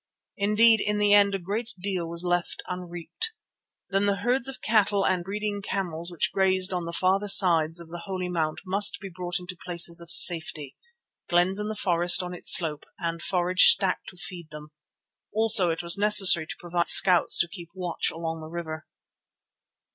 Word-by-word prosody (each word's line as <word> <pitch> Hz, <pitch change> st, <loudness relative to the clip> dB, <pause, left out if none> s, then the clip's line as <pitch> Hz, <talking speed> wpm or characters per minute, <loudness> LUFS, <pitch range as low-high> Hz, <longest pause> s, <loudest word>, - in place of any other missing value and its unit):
Indeed 215 Hz, +2 st, +3 dB
in 210 Hz, 0 st, -1 dB
the 205 Hz, 0 st, +2 dB
end 200 Hz, -1 st, +3 dB
a -, -, -2 dB
great 215 Hz, +6 st, -6 dB
deal 180 Hz, -3 st, -5 dB
was 170 Hz, +1 st, -5 dB
left 175 Hz, -1 st, -3 dB
unreaped. 180 Hz, -, -6 dB, 0.6 s
Then 195 Hz, +1 st, 0 dB
the 200 Hz, -, 0 dB
herds 245 Hz, +5 st, -1 dB
of 270 Hz, -, -6 dB
cattle 205 Hz, -2 st, 0 dB
and 185 Hz, -2 st, -1 dB
breeding 205 Hz, +2 st, -5 dB
camels 175 Hz, -4 st, -4 dB
which 170 Hz, -, -2 dB
grazed 190 Hz, -1 st, 0 dB
on 175 Hz, -2 st, -4 dB
the 170 Hz, -, -6 dB
farther 190 Hz, +4 st, -1 dB
sides 170 Hz, -4 st, +3 dB
of 170 Hz, -1 st, -13 dB
the 170 Hz, +1 st, -9 dB
Holy 185 Hz, -2 st, -5 dB
Mount 160 Hz, -3 st, -4 dB
must 200 Hz, +2 st, 0 dB
be 195 Hz, -, -10 dB
brought 175 Hz, 0 st, -5 dB
into 180 Hz, +1 st, -10 dB
places 170 Hz, -1 st, +1 dB
of 170 Hz, -, -13 dB
safety, 160 Hz, -4 st, +3 dB, 0.5 s
glens 180 Hz, +3 st, +1 dB
in 210 Hz, -, -4 dB
the 215 Hz, -, -5 dB
forest 175 Hz, -1 st, +1 dB
on 180 Hz, 0 st, -8 dB
its 175 Hz, -, +2 dB
slope, 155 Hz, -4 st, +4 dB
and 170 Hz, -1 st, -5 dB
forage 180 Hz, 0 st, +2 dB
stacked 190 Hz, -2 st, +1 dB
to 185 Hz, -, -18 dB
feed 170 Hz, -1 st, -7 dB
them. 150 Hz, 0 st, -12 dB, 0.6 s
Also 220 Hz, -4 st, +4 dB
it 165 Hz, +1 st, -4 dB
was 170 Hz, +3 st, +4 dB
necessary 195 Hz, -6 st, +4 dB
to -, -, -8 dB
provide 175 Hz, 0 st, -3 dB
scouts 180 Hz, -3 st, +5 dB
to 170 Hz, -, +1 dB
keep 170 Hz, -1 st, -11 dB
watch 180 Hz, -2 st, -3 dB
along 165 Hz, 0 st, -7 dB
the 155 Hz, -, -10 dB
river. 160 Hz, -2 st, -8 dB
180 Hz, 185 wpm, -24 LUFS, 170-200 Hz, 0.6 s, scouts